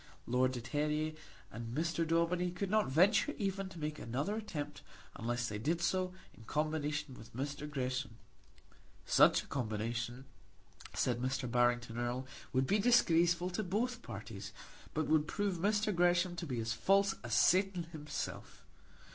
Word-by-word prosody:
Lord 130 +1 +2
de 125 - -4
Terrier 150 +4 -1 0.4
and 115 +2 -6
Mr. 165 0 0
Daubeny 170 +2 +2
could 185 +2 -3
not 215 0 +3
venture 200 - +4
even 195 -1 -2
to 185 - -11
make 155 -1 -3
another 140 - -2
attempt 205 -10 -5 0.3
unless 120 +1 -1
they 105 -1 -4
did 160 +9 0
so 185 +2 +1 0.2
in 115 - -15
combination 150 -1 -1
with 115 -2 -13
Mr. 145 +3 -4
Gresham. 130 -4 -3 0.9
Such - - +5
a - - -15
combination, 120 +1 -3 0.7
said 120 -1 +1
Mr. 130 +1 -1
Barrington 120 -1 +2
Erle, 120 +2 -2 0.3
would 130 0 +2
be 205 +10 +2
disgraceful 175 -6 +4
to 180 - -1
both 230 +6 -1
parties, 100 - -7 0.4
but 155 0 +1
would 155 0 +3
prove 200 -2 -1
Mr. 210 +3 +2
Gresham 175 +1 +3
to 170 - -4
be 125 -4 -2
as 115 +1 -1
false 195 - +3
as - - -1
Satan 190 -1 +4
himself. 150 -2 -6
150 Hz, 150 wpm, -35 LUFS, 125-180 Hz, 0.9 s, Such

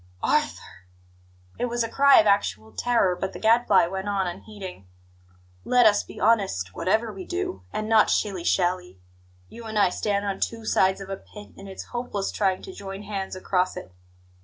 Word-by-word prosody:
"Arthur!" 90 - -1 0.7
It - - +1
was 240 -1 -1
a - - -2
cry 280 +4 +6
of 215 - +4
actual 200 - +1
terror; 230 - +1
but 190 +1 -4
the - - -8
Gadfly 220 -4 +4
went 190 +3 -4
on, 195 -2 0
unheeding: 185 - -8 0.8
"Let 250 -1 +4
us 205 -1 +5
be - - -12
honest, 190 - +1
whatever 220 - 0
we 190 -1 -7
do, 90 - -4
and 215 - -3
not 220 -1 +5
shilly 195 -5 0
shally. 180 - 0 0.5
You 230 0 -11
and 220 -1 -4
I 200 -3 +5
stand 200 +1 -1
on 195 -1 -2
two 225 -1 -3
sides 190 -2 +2
of 195 0 -8
a 195 - -3
pit, 210 +1 -13
and 195 0 -11
it's 190 - -7
hopeless 240 -5 -3
trying 190 -3 0
to 380 - -9
join 195 - -8
hands 195 -2 -4
across 185 0 -1
it. 90 - -8
200 Hz, 185 wpm, -25 LUFS, 185-220 Hz, 0.8 s, cry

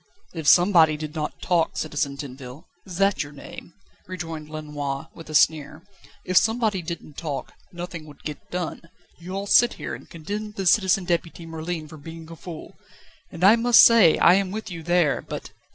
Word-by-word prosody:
"If 160 -4 -5
somebody 170 -4 +5
did 150 0 -6
not 155 -2 -5
talk, 175 -2 +1
Citizen 145 -2 -2
Tinville 135 0 -9 0.2
is 180 -2 -7
that 195 +1 +2
your 145 -2 -6
name?" 150 +3 -11 0.3
rejoined 165 -4 -6
Lenoir, 145 -3 -5
with 165 -2 -12
a 155 - -4
sneer 155 +2 +2 0.4
"if 185 0 +1
somebody 220 -4 +2
didn't 165 -3 -8
talk, 150 -5 -5 0.2
nothing 175 -2 -7
would 145 -2 -15
get 150 -2 -8
done. 180 -2 -4 0.4
You 180 +3 -7
all 195 +1 -3
sit 240 +4 +5
here, - - -6
and - - -10
condemn 205 +6 -6
the 195 -2 -4
Citizen 190 0 +3
Deputy 170 -1 -2
Merlin 160 0 -5
for 155 - -12
being 165 +2 -10
a - - -8
fool, 165 -1 -10 0.5
and 170 - -7
I 200 +4 +8
must 235 0 +6
say 225 -9 +7
I 170 - +6
am 195 0 +1
with 215 0 -6
you 170 -2 -6
there, 175 -3 +2
but - - -8
165 Hz, 185 wpm, -24 LUFS, 155-185 Hz, 0.5 s, I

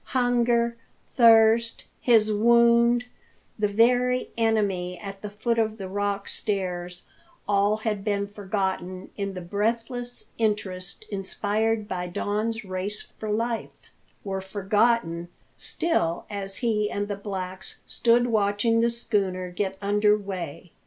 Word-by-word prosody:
Hunger, 240 -1 +2 0.3
thirst, 230 -1 +5 0.2
his 220 -3 +4
wound, 235 +2 +4 0.5
the 210 - +3
very 245 +4 +2
enemy 200 -6 0
at 195 0 -8
the 210 - -5
foot 230 +3 -1
of 220 -1 0
the 195 -3 -6
rock 200 +1 -2
stairs 180 -3 -3 0.4
all 205 +1 +3
had 215 -2 -2
been 200 -1 0
forgotten 190 -2 -3
in 200 -1 -3
the 185 - -5
breathless 230 +6 -3
interest 195 -5 -2
inspired 210 +2 -1
by 180 -2 -3
Don's 215 +5 -2
race 190 +2 -5
for 215 - -4
life; 230 +2 -3 0.3
were 195 -1 -3
forgotten 195 -2 +1 0.3
still 175 - -1
as 195 -1 -4
he 210 -2 +1
and 205 0 -2
the 205 - -3
blacks 190 -2 -6
stood 240 +1 +3
watching 220 0 +2
the 235 - +3
schooner 195 -6 -1
get 190 +1 -2
under 210 +1 +3
weigh. 185 -4 -6
210 Hz, 125 wpm, -26 LUFS, 195-230 Hz, 0.5 s, thirst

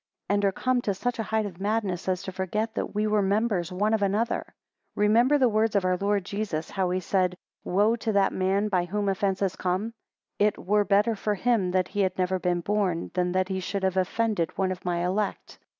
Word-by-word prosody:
And 205 0 +2
are 195 - +3
come 255 +5 0
to 200 -4 -1
such 245 +4 -2
a 215 -4 -3
height 220 -1 +1
of 190 -2 -8
madness, 200 -4 -1
as 185 -1 -1
to 190 - -5
forget 210 +4 -2
that - - -4
we 210 +1 +1
were 210 -1 +2
members 200 -3 0
one 205 +4 0
of 220 - +1
another? 210 +4 0 0.5
18 - - -1
Remember 235 +7 +4
the 260 -3 +4
words 220 0 +1
of 195 -2 +2
our 185 0 +2
Lord 200 0 0
Jesus, 200 -6 -3
(how 190 -2 0
he 185 +1 0
said, 185 0 0 0.3
Woe 205 +5 +2
to 220 0 -2
that 200 -1 +3
man 195 +2 +1
by 185 -4 +1
whom 205 +3 -2
offences 195 -1 0
come). 185 +5 -2 0.5
It, 210 0 +3
were 205 +3 +1
better 210 +3 +3
for 210 0 -1
him 220 -3 +1
that 185 0 0
he 205 - -4
had 190 -1 0
never 185 0 0
been 175 -1 0
born, 195 -3 -1
than 180 0 0
that 185 0 +1
he 190 -1 -1
should 195 +1 -3
have 190 -1 +1
offended 190 -2 0
one 190 -1 +1
of 185 - -6
my 175 -1 -1
elect. 195 +3 -2
195 Hz, 225 wpm, -26 LUFS, 185-210 Hz, 0.5 s, Remember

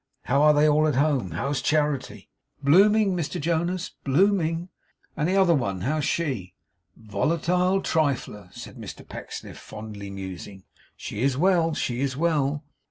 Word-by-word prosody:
How 140 +3 +2
are 150 0 +7
they 150 +1 +5
all 155 +1 +4
at 150 - 0
home? 140 -8 +1
How's 135 - -2
Charity?' 150 -3 -1 0.4
'Blooming, 200 +6 +5
Mr 165 -5 -3
Jonas, 170 +3 -1
blooming.' 170 +2 +2 0.5
'And 155 +2 0
the 190 - +1
other 190 -3 +5
one; 100 - -1
how's 150 +7 0
she?' 120 - -2 0.4
'Volatile 170 - 0
trifler!' 135 - -1
said - - -10
Mr - - -9
Pecksniff, - - -8
fondly 105 -2 -8
musing. 95 0 -8 0.3
'She 105 - -6
is 135 0 +1
well, 170 -1 +3
she 120 0 -2
is 135 -2 -1
well. 150 -2 0
150 Hz, 145 wpm, -25 LUFS, 125-170 Hz, 0.5 s, are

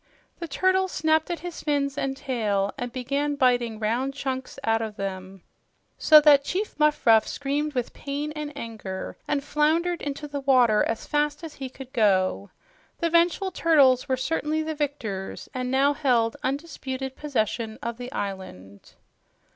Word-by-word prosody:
The 340 - -4
turtles 375 +5 +1
snapped 315 +1 +1
at 345 - -3
his 350 -1 -7
fins 280 -2 0
and 270 -1 -2
tail 210 -7 -1
and 245 0 -5
began 280 +4 -1
biting 245 -4 +2
round 240 +5 -1
chunks 260 -2 -4
out 225 0 +2
of 220 -2 -4
them 190 -2 -6 0.6
so 310 -2 +8
that 290 -2 +6
Chief 385 +8 -3
Muffruff 270 -7 +4
screamed 285 +1 -2
with 245 -2 -2
pain 290 +1 -4
and 300 -1 -5
anger 215 -6 -6
and 285 -1 0
floundered 325 +4 +1
into 290 +1 -4
the 285 0 -4
water 250 -6 +4
as 225 - -3
fast 295 +1 -1
as 320 -2 -7
he 265 -2 -6
could 260 +1 -12
go. 185 - +2 0.5
The 335 -1 -1
vengeful 345 +3 +2
turtles 285 -6 +4
were 260 - +1
certainly 310 +3 -1
the 315 0 -3
victors, 235 -10 -4
and 255 -1 -3
now 275 +2 +3
held 245 -6 +1
undisputed 265 -2 -4
possession 225 -5 -2
of 235 -1 -3
the 250 +1 -7
island. 185 - -7
270 Hz, 155 wpm, -25 LUFS, 230-300 Hz, 0.6 s, so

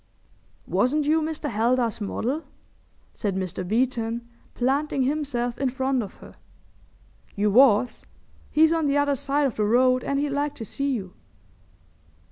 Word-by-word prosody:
"Wasn't 290 +4 +1
you 315 +2 +3
Mr. 310 -1 -3
Heldar's 230 0 0
model?" 255 +9 -2 0.7
said 200 -4 -2
Mr. 185 -1 -3
Beeton, 235 +2 -1 0.3
planting 270 +2 0
himself 255 -4 -2
in 270 - +1
front 265 0 0
of 205 - -7
her. - - -15 1.0
"You 205 +1 +1
was. 245 0 +4 0.4
He's 320 +2 +4
on 325 -3 +1
the 280 0 +2
other 285 -1 +2
side 280 +2 0
of 265 - -2
the 215 - +1
road 255 +3 +3
and 280 - -1
he'd 290 +1 0
like 285 +1 -1
to 225 - -7
see 275 +7 -3
you." 195 -8 -4
255 Hz, 145 wpm, -25 LUFS, 230-285 Hz, 1.0 s, was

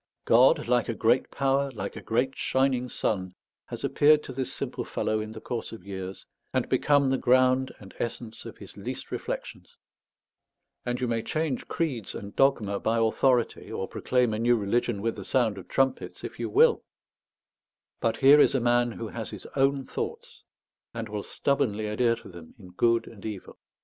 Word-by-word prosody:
God, 120 0 +5
like 120 -1 +2
a 115 - -1
great 115 +4 +2
power, 140 0 +1
like 105 -6 -6
a - - -7
great 125 +4 0
shining 130 -2 +1
sun, 95 -5 -2 0.3
has - - -7
appeared 150 +1 +4
to 130 - -8
this 130 0 -3
simple - - -3
fellow 110 0 -1
in 110 0 -5
the 110 - -8
course 115 +1 -5
of 105 -5 -10
years, 95 -1 -7 0.3
and - - +1
become 140 -2 +3
the 135 - +1
ground 130 +1 +3
and 100 -2 -13
essence 115 -1 -5
of - - -9
his - - -12
least - - -6
reflections; - - -6 1.1
and 125 0 -1
you 125 - -1
may 115 -1 0
change 155 0 -2
creeds 130 - -2
and 100 0 -8
dogma 110 -8 +2
by 115 +1 0
authority, 120 +2 +1
or - - -3
proclaim 125 -3 +1
a 110 - -2
new 120 +1 +4
religion 105 0 0
with 115 0 0
the - - -6
sound 115 -7 +1
of 95 - -12
trumpets, 135 -1 -1
if - - -7
you - - -2
will; 470 +4 +4 1.2
but - - 0
here 140 +2 +7
is - - +5
a - - +3
man 120 0 +2
who 115 -1 -6
has 115 -2 -6
his - - -9
own 135 0 +2
thoughts, - - -6 0.5
and 115 -2 -4
will 105 0 -3
stubbornly 115 -4 -1
adhere 115 +2 +2
to - - -13
them 85 -3 -12
in 95 -5 -13
good 115 +5 +2
and 105 -4 -13
evil. 105 -4 -7
120 Hz, 185 wpm, -27 LUFS, 110-130 Hz, 1.2 s, here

